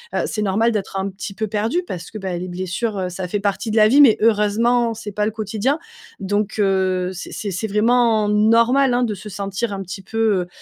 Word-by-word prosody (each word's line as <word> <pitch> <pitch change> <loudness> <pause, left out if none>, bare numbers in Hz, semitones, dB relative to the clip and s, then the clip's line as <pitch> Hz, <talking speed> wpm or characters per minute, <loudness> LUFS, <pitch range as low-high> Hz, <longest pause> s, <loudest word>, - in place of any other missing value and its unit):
heu, - - +1
c'est 215 - -3
normal 210 +3 +2
d'être 195 -2 -3
un 190 - -2
petit 195 +1 -7
peu 220 +2 -2
perdu, 220 - -1
parce 175 -2 -6
que, 220 - -7
bah, 190 -3 -4
les 180 - -5
blessures, 185 +5 -3
heu, 185 -1 -2
ça 180 +1 -5
fait 205 +3 -2
partie 200 +1 -2
de 215 - -2
la 215 0 +7
vie 280 +6 +6
mais, 240 -7 +7
heureusement, 230 +2 +2
c'est 210 -2 -7
pas 210 +1 -1
le 220 - -1
quotidien. 220 +6 -1 0.4
Donc, 205 +2 -1
heu, 185 -2 +1
c'est 185 - -8
c'est 205 -2 -4
c'est 185 +5 -3
vraiment 220 0 +2
normal, 230 +5 +4
hein, 245 0 +2
de 220 -3 -1
se 200 +2 -10
sentir 200 +3 -3
un 195 - -4
petit 195 +2 -7
peu, 205 -3 0
210 Hz, 225 wpm, -20 LUFS, 195-225 Hz, 0.4 s, la